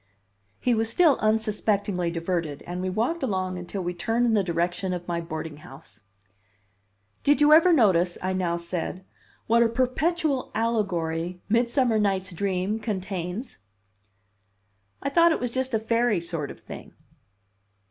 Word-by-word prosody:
He 250 Hz, -, +1 dB
was 225 Hz, 0 st, +1 dB
still 310 Hz, +3 st, +4 dB
unsuspectingly 210 Hz, -4 st, 0 dB
diverted; 170 Hz, -3 st, -3 dB
and 180 Hz, +1 st, -5 dB
we 185 Hz, -, -1 dB
walked 240 Hz, -, -1 dB
along 185 Hz, -6 st, -2 dB
until 180 Hz, +2 st, -5 dB
we 175 Hz, 0 st, -2 dB
turned 225 Hz, +8 st, 0 dB
in 230 Hz, -, +2 dB
the 205 Hz, -2 st, +3 dB
direction 175 Hz, +2 st, -1 dB
of 175 Hz, -1 st, -5 dB
my 170 Hz, -1 st, -1 dB
boarding 160 Hz, -2 st, -6 dB
house. 135 Hz, -8 st, -13 dB, 1.2 s
"Did 290 Hz, 0 st, +4 dB
you 295 Hz, +1 st, +6 dB
ever 330 Hz, +3 st, +7 dB
notice," 185 Hz, -, +3 dB
I 185 Hz, +1 st, -2 dB
now 175 Hz, -2 st, 0 dB
said, 175 Hz, +2 st, -5 dB, 0.4 s
"what 235 Hz, +1 st, +4 dB
a 235 Hz, -, +4 dB
perpetual 275 Hz, +4 st, 0 dB
allegory 180 Hz, -7 st, -1 dB
'Midsummer 235 Hz, 0 st, +2 dB
Night's 195 Hz, -2 st, 0 dB
Dream' 195 Hz, +3 st, -1 dB
contains?" 190 Hz, -, -4 dB, 1.4 s
"I -, -, 0 dB
thought 340 Hz, +2 st, +5 dB
it -, -, 0 dB
was 245 Hz, -1 st, -2 dB
just 260 Hz, +1 st, -1 dB
a -, -, +2 dB
fairy 230 Hz, -2 st, +1 dB
sort 165 Hz, -4 st, -4 dB
of -, -, -10 dB
thing." -, -, -10 dB
195 Hz, 145 wpm, -25 LUFS, 175-235 Hz, 1.4 s, ever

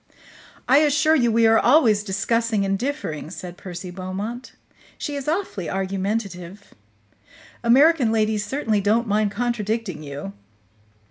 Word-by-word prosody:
"I 270 Hz, +3 st, +6 dB
assure 310 Hz, +1 st, +3 dB
you 240 Hz, -7 st, +3 dB
we 230 Hz, +1 st, +3 dB
are 225 Hz, 0 st, +5 dB
always 235 Hz, -6 st, +4 dB
discussing 215 Hz, +1 st, 0 dB
and 195 Hz, 0 st, 0 dB
differing," 195 Hz, -, -4 dB
said 180 Hz, 0 st, -8 dB
Percy 180 Hz, 0 st, -8 dB
Beaumont. 195 Hz, +7 st, -6 dB, 0.4 s
"She 290 Hz, -, -4 dB
is 280 Hz, -1 st, -5 dB
awfully 310 Hz, -, -2 dB
argumentative. 195 Hz, 0 st, -4 dB, 0.9 s
American 265 Hz, +1 st, +4 dB
ladies 215 Hz, -1 st, +1 dB
certainly 220 Hz, -3 st, -1 dB
don't 220 Hz, +4 st, +2 dB
mind 210 Hz, 0 st, +1 dB
contradicting 220 Hz, -5 st, -2 dB
you. 140 Hz, -8 st, -7 dB
215 Hz, 125 wpm, -22 LUFS, 195-240 Hz, 0.9 s, I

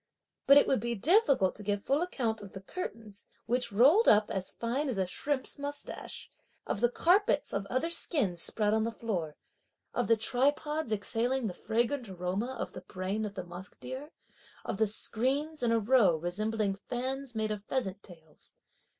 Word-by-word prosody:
But 280 Hz, -, +9 dB
it 285 Hz, -, +7 dB
would 265 Hz, -, +2 dB
be 235 Hz, +2 st, -2 dB
difficult 275 Hz, -, +3 dB
to -, -, -11 dB
give 205 Hz, 0 st, -1 dB
a -, -, -33 dB
full 280 Hz, +3 st, +1 dB
account 235 Hz, -11 st, -2 dB
of 200 Hz, -2 st, -11 dB
the 190 Hz, -, -8 dB
curtains, 215 Hz, -, -7 dB, 0.2 s
which 245 Hz, -1 st, 0 dB
rolled 280 Hz, -, +5 dB
up 210 Hz, 0 st, +5 dB
(as 190 Hz, -1 st, -3 dB
fine 260 Hz, +5 st, -2 dB
as 240 Hz, -, -2 dB
a) 190 Hz, -, +1 dB
shrimp's 275 Hz, +9 st, -1 dB
moustache; 285 Hz, 0 st, -5 dB, 0.3 s
of 200 Hz, -, -3 dB
the 240 Hz, -, +4 dB
carpets 375 Hz, -, +2 dB
of 200 Hz, -, -2 dB
other 260 Hz, +9 st, -1 dB
skins 210 Hz, -, +2 dB
spread 210 Hz, +2 st, +2 dB
on 220 Hz, 0 st, +2 dB
the 230 Hz, -, 0 dB
floor; 195 Hz, -9 st, -3 dB, 0.6 s
of -, -, 0 dB
the 230 Hz, -, +4 dB
tripods 285 Hz, +4 st, 0 dB
exhaling 230 Hz, +4 st, 0 dB
the 195 Hz, -, -2 dB
fragrant 235 Hz, +4 st, -1 dB
aroma 190 Hz, +7 st, -3 dB
of -, -, -4 dB
the -, -, -8 dB
brain 190 Hz, +4 st, -3 dB
of 205 Hz, -1 st, -6 dB
the 185 Hz, -, -4 dB
musk 180 Hz, +2 st, -11 dB
deer; 260 Hz, +4 st, -7 dB, 0.6 s
of 210 Hz, -, -3 dB
the 220 Hz, -, +3 dB
screens 270 Hz, +9 st, -1 dB
in 240 Hz, -2 st, +2 dB
a 230 Hz, -, +4 dB
row 220 Hz, -5 st, +4 dB
resembling 200 Hz, +5 st, -1 dB
fans 255 Hz, +5 st, -5 dB
made 215 Hz, -1 st, -1 dB
of 210 Hz, -1 st, -4 dB
pheasant 205 Hz, -7 st, -2 dB
tails. 160 Hz, -4 st, -15 dB
225 Hz, 185 wpm, -30 LUFS, 200-265 Hz, 0.6 s, But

